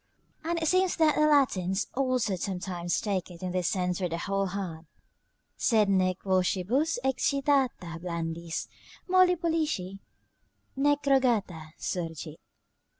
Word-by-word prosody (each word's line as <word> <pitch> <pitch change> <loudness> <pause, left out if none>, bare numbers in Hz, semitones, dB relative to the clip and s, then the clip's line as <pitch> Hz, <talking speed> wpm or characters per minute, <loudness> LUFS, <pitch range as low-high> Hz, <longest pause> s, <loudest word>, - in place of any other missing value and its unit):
And 335 +1 -1
it 320 - -1
seems 370 +2 +3
that 315 -2 +4
the 305 - +3
Latins 200 -10 +2
also 255 -6 0
sometimes 180 -1 -2
take 195 -5 -2
it 175 0 -11
in 180 - -2
this 180 -1 0
sense 180 -2 -1
for 180 -2 -1
the 165 - -3
whole 195 +3 -1
hand: 180 -4 -5 0.7
"Sed 215 -4 +3
nec 185 -1 +1
vocibus 195 - +1
excitata 265 - 0
blandis, 170 -1 -4 0.4
Molli 370 -1 +5
pollici 310 - -2 0.8
nec 290 +1 +2
rogata, 225 - +1
surgit." 165 -3 -4
195 Hz, 125 wpm, -28 LUFS, 180-280 Hz, 0.8 s, Molli